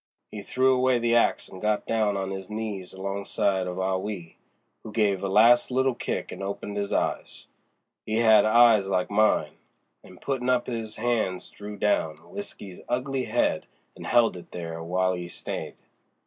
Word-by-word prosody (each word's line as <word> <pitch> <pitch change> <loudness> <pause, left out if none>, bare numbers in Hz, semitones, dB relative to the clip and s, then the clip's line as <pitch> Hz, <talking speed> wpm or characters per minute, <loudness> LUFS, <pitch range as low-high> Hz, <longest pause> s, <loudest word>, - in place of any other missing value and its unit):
He 105 - -6
threw 130 +5 +2
away 130 0 +3
the 120 0 +1
axe 120 - +2
and 95 - -11
got 105 -1 0
down 110 -3 +1
on 95 0 -3
'is 95 0 -6
knees 105 -4 -5
alongside 95 -1 -1
of 90 0 -5
Ah 95 0 0
Wee, 95 -4 -6 0.4
who 110 - -9
gave 105 -4 +1
a 100 - -1
last 115 +5 +5
little 130 +1 +2
kick - - -4
and - - -8
opened 100 +1 -5
'is 100 -1 -2
eyes—he 110 - -5
had 110 -1 +6
eyes 110 -2 +5
like 95 -1 0
mine—an' 100 -3 -2
puttin' 130 +1 -2
up 125 -1 +2
'is 115 -3 -4
hands 110 -6 -1
drew 105 0 -9
down 90 -6 +1
W'isky's 105 - -8
ugly 130 +1 -1
head - - 0 0.3
and - - -9
held 120 -4 +4
it 90 - -11
there 85 -2 -6
w'ile 90 +2 0
'e 90 -1 -6
stayed. 85 - -6
105 Hz, 165 wpm, -26 LUFS, 95-120 Hz, 0.4 s, had